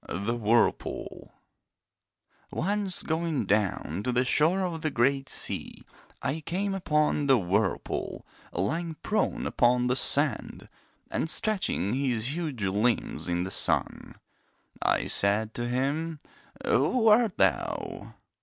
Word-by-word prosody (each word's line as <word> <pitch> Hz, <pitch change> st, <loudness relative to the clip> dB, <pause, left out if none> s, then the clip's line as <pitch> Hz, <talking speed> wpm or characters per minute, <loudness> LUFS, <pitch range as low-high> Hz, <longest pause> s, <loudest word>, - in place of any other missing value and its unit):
The 100 Hz, +6 st, -2 dB
Whirlpool 115 Hz, 0 st, 0 dB, 1.2 s
Once 195 Hz, +1 st, 0 dB
going 160 Hz, -6 st, -1 dB
down 100 Hz, -3 st, 0 dB
to 125 Hz, -, -1 dB
the 125 Hz, +1 st, +1 dB
shore 160 Hz, +8 st, +2 dB
of 170 Hz, -3 st, -3 dB
the 155 Hz, -, 0 dB
great 135 Hz, +1 st, +1 dB
sea -, -, -2 dB, 0.4 s
I 155 Hz, -, -1 dB
came 195 Hz, +5 st, -2 dB
upon 150 Hz, -5 st, +1 dB
the 135 Hz, -2 st, +6 dB
Whirlpool 100 Hz, 0 st, -1 dB, 0.3 s
lying 160 Hz, -, -2 dB
prone 215 Hz, -, 0 dB
upon 125 Hz, 0 st, +2 dB
the 125 Hz, 0 st, +1 dB
sand 130 Hz, -, +1 dB, 0.4 s
and 160 Hz, -, -1 dB
stretching 185 Hz, -, +1 dB
his 130 Hz, 0 st, 0 dB
huge 150 Hz, -10 st, -3 dB
limbs 105 Hz, +1 st, 0 dB
in 85 Hz, 0 st, 0 dB
the 95 Hz, -, -5 dB
sun. -, -, -1 dB, 0.7 s
I -, -, +1 dB
said 105 Hz, +2 st, +2 dB
to 120 Hz, 0 st, -3 dB
him: 145 Hz, +6 st, -1 dB, 0.5 s
'Who 240 Hz, -3 st, +2 dB
art 220 Hz, -2 st, +4 dB
thou?' 95 Hz, -10 st, -1 dB
135 Hz, 120 wpm, -28 LUFS, 110-165 Hz, 1.2 s, the